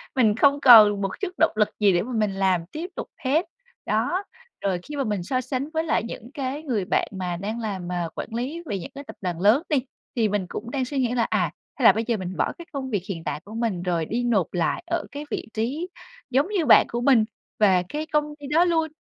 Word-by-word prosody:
mình 220 -5 +4
không 280 +4 +4
còn 215 -6 +8
một 195 -1 -1
chút 395 - -1
động 325 - +4
lực 210 -1 +3
gì 205 -2 +5
để 175 - +2
mà 250 - -7
mình 215 -3 +1
làm 190 -3 +1
tiếp 330 +4 -5
tục - - -5 0.2
hết. 305 +7 +2 0.4
Đó, 245 - 0 0.4
rồi 190 -3 0
khi 295 - -8
mà 280 - 0
mình 210 -6 -2
so 255 +7 -1
sánh 260 +2 -3
với 320 0 +1
lại 320 - +1
những 235 +1 -8
cái 280 0 -4
người 230 -10 -1
bạn - - +1
mà 180 -3 -3
đang 210 +5 -4
làm 195 -6 -4
mà 175 -1 -2
quản - - -4
lý 280 +9 -3
về 200 -10 -3
những 170 - -8
cái 280 - -7
tập - - -11
đoàn 175 -3 -3
lớn 220 - +5
đi, 300 - +3 0.4
thì 225 -3 +2
mình 205 -2 -1
cũng 235 - -6
đang 265 -1 -1
suy 280 +3 -5
nghĩ 245 -2 +1
là, 240 -2 +2
à, - - 0 0.2
hay 260 - -1
là - - +10
bây 220 +3 -1
giờ 235 -2 +1
mình 185 -1 -5
bỏ - - +1
cái 340 - -9
công 270 -2 -4
việc 205 -7 -1
hiện 165 -4 -4
tại - - -3
của 210 - -10
mình 225 -7 -1
rồi 170 -3 0
đi 235 +8 -2
nộp 220 -7 +1
lại 175 - 0
ở 340 - 0
cái 290 +1 -6
vị - - -3
trí 265 +11 -2 0.4
giống 265 +4 +2
như 385 -6 0
bạn 240 - +7
của 235 - -2
mình 245 -4 +5 0.3
và 190 -4 +4
cái 300 +1 -3
công 300 -1 0
ty 285 - -8
đó 320 +5 +4
luôn, 325 -2 +2
235 Hz, 255 wpm, -24 LUFS, 200-285 Hz, 0.4 s, là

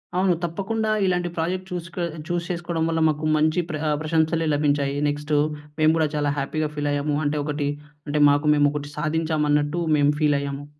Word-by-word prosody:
అవును. 185 0 +3
తప్పకుండా 205 +6 -2 0.2
ఇలాంటి 180 -1 0
ప్రాజెక్ట్ 180 +3 -1
చూ‌స్‌కొ 175 0 -4 0.2
చూ‌స్ 175 -1 -2
చేసుకోవడం 170 -2 -2
వల్ల 165 0 0
మాకు 155 0 -1
మంచి 155 +3 +2
ప్ర 155 -2 -3 0.2
ప్రశంసలే 160 +1 +1
లభించాయి. 145 -1 +1
నెక్స్ట్ 145 +1 -3 0.5
మేము 155 0 +5
కూడా 160 -1 +2
చాలా 145 -1 +1
హ్యాపీ‌గా 150 +2 -1
ఫీలయ్యాము. 145 0 -1
అంటే 145 +1 0
ఒకటి, 145 -1 -2 0.4
అంటే 150 +1 0
మాకు 145 +1 +2
మేము 145 0 +4
ఒకటి 145 0 -5
సాధించామన్నట్టు 150 0 0 0.2
మేము 145 0 +4
ఫీల్ 150 -2 +3
అయ్యాము. 140 0 -5
155 Hz, 160 wpm, -23 LUFS, 145-170 Hz, 0.5 s, మేము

